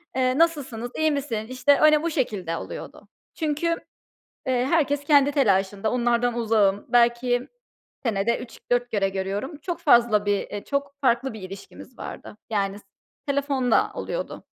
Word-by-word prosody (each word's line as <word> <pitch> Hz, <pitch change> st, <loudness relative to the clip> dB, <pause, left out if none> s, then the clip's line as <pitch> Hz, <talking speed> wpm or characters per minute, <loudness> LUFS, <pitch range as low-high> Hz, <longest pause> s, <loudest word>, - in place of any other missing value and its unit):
Eee, 255 Hz, 0 st, +1 dB
"Nasılsınız, 270 Hz, -8 st, 0 dB
iyi 315 Hz, -1 st, +2 dB
misin?" 255 Hz, -7 st, -2 dB
işte, 255 Hz, +3 st, +3 dB
öyle 305 Hz, 0 st, +5 dB
bu 335 Hz, -, 0 dB
şekilde 200 Hz, -, -2 dB
oluyordu. -, -, -8 dB, 0.3 s
Çünkü, 310 Hz, +1 st, -1 dB, 0.8 s
eee, 255 Hz, -1 st, +1 dB
herkes 285 Hz, -2 st, +1 dB
kendi 285 Hz, -1 st, +5 dB
telaşında, 200 Hz, -5 st, +1 dB
onlardan 240 Hz, 0 st, +1 dB
uzağım. 215 Hz, -4 st, +2 dB
Belki 245 Hz, +1 st, +2 dB, 0.6 s
senede 225 Hz, 0 st, 0 dB
3-4 245 Hz, 0 st, -2 dB
kere 195 Hz, -2 st, +1 dB
görüyorum. 195 Hz, -, -4 dB
Çok 340 Hz, +2 st, -5 dB
fazla 235 Hz, -8 st, +4 dB
bir, 205 Hz, -1 st, +2 dB
eee 205 Hz, -1 st, -6 dB
çok 280 Hz, 0 st, -3 dB
farklı 255 Hz, 0 st, +1 dB
bir 220 Hz, -, -9 dB
ilişkimiz 195 Hz, +6 st, -11 dB
vardı. -, -, -8 dB
Yani 200 Hz, -2 st, -1 dB
s -, -, -24 dB, 0.4 s
telefonla 275 Hz, -3 st, +1 dB
oluyordu. -, -, -5 dB
245 Hz, 140 wpm, -24 LUFS, 210-280 Hz, 0.8 s, öyle